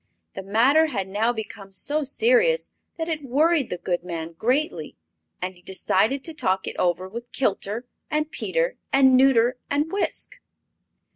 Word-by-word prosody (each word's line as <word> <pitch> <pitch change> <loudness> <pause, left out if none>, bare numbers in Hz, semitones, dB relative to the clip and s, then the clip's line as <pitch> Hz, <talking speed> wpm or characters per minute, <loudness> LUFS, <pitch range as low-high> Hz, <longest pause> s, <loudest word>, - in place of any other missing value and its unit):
The - - -6
matter 245 +11 +4
had 200 -10 -3
now 210 +5 +1
become 210 -3 -7
so 290 +11 -2
serious 485 - +2 0.3
that 325 -1 -3
it 315 -2 -2
worried 290 +2 +2
the 180 - -3
good 175 0 -2
man 165 -2 -5
greatly, 260 - -1 0.5
and 185 +1 -3
he 175 - -18
decided 205 +8 +1
to 325 - -5
talk 190 -10 0
it - - -5
over 180 +1 0
with 235 +5 -8
Kilter 220 -1 -1 0.2
and 305 0 -1
Peter - - -1
and 265 -1 +6
Nuter 250 -1 +4
and 295 +3 0
Wisk. 400 +1 -2
250 Hz, 155 wpm, -24 LUFS, 195-305 Hz, 0.5 s, and